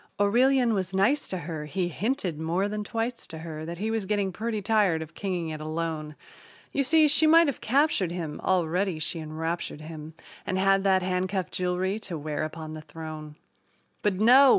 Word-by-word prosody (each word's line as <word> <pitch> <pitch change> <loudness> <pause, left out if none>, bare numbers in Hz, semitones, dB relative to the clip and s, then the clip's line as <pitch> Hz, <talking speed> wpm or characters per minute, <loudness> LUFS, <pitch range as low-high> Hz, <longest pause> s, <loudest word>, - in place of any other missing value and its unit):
Aurelian 245 +4 +4
was 190 -2 -2
nice 250 +10 +2
to 185 - -2
her 160 -3 -5
he 180 +3 -1
hinted 190 - -2
more 170 +5 0
than 210 0 -3
twice 230 +3 -3
to 160 - -8
her 155 -1 -6
That 170 +1 -5
he 215 +4 -2
was 220 -4 -2
getting 200 -2 0
pretty 220 +2 -2
tired 200 -6 +2
of 160 +1 -13
kinging 175 -4 -3
it 155 - -6
alone. 155 -1 -3 0.6
You 275 - +1
see, 310 +3 +5
she 300 +2 +5
might 330 +2 +7
have 280 -5 -2
captured 260 - +2
him 165 -4 -5
already 180 0 +1
she 160 +2 -2
enraptured 160 0 -4
him 155 0 -9 0.3
And 190 - -2
had 195 0 +3
that 190 -1 +4
handcuff 185 +1 -1
jewelry 185 +3 -1
to 180 -6 -6
wear 150 0 -3
upon 155 0 -5
the 155 - -7
throne. 155 0 -8 0.7
But, 205 -2 +1
no! 250 +7 +7
185 Hz, 185 wpm, -27 LUFS, 160-215 Hz, 0.7 s, might